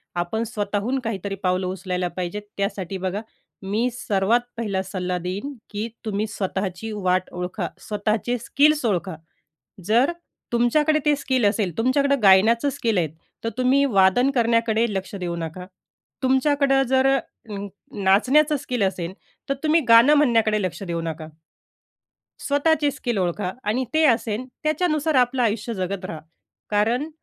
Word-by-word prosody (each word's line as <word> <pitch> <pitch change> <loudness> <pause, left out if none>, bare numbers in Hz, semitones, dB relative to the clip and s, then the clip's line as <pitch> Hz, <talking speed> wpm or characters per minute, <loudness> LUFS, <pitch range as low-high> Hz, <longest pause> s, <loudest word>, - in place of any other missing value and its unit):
आपण 175 +6 -1
स्वतःहून 215 +3 -2
काहीतरी 200 -5 -4
पावलं 185 0 +1
उचलायला 180 -1 -2
पाहिजेत. 185 +3 -3 0.2
त्यासाठी 195 -2 -2
बघा, 190 +2 -3 0.4
मी 210 +5 0
सर्वात 215 0 +1 0.2
पहिला 205 -5 -1
सल्ला 185 -1 -3
देईन 185 +11 -4 0.2
की 210 +2 -3 0.2
तुम्ही 210 0 -1
स्वतःची 195 0 -3
वाट 185 -2 0
ओळखा, 180 +1 -3
स्वतःचे 215 +3 -1
स्किल्स 295 +4 +2
ओळखा. 185 -4 -1 0.7
जर 235 - +3 0.4
तुमच्याकडे 300 +6 +3
ते 295 - +5
स्किल 260 -4 0
असेल, 200 -5 0
तुमच्याकडं 275 +2 +2
गाण्याचं 220 +7 +5
स्किल 230 -7 -1
आहे, 165 -3 +1 0.4
तर - - 0
तुम्ही 260 +2 +3
वादन 220 +2 +4
करण्याकडे 230 -1 +2
लक्ष 190 0 -4
देऊ 175 -3 -3
नका. 170 +2 -6 0.6
तुमच्याकडं 270 +1 +3
जर 265 +1 +3 0.4
अ, - - -5 0.5
नाचण्याचं 270 +11 +4
स्किल 250 -4 -3
असेल, 185 -2 -2 0.4
तर 275 - +1
तुम्ही 315 +2 +4
गाणं 230 +6 +7
म्हणण्याकडे 225 -7 +3
लक्ष 185 +2 -4
देऊ 170 -3 -3
नका. 160 -1 -5 1.1
स्वतःची 290 +1 +2
स्किल 245 -5 -3
ओळखा 180 +1 -1
आणि 225 +5 0
ते 315 +1 +3
असेल 230 -2 +1 0.2
त्याच्यानुसार 310 -1 +1
आपलं 250 0 +3
आयुष्य 225 +1 -1
जगत 185 -1 -3
राहा, 160 -4 -6 0.5
कारण 230 +8 +1
220 Hz, 135 wpm, -23 LUFS, 190-260 Hz, 1.1 s, गाणं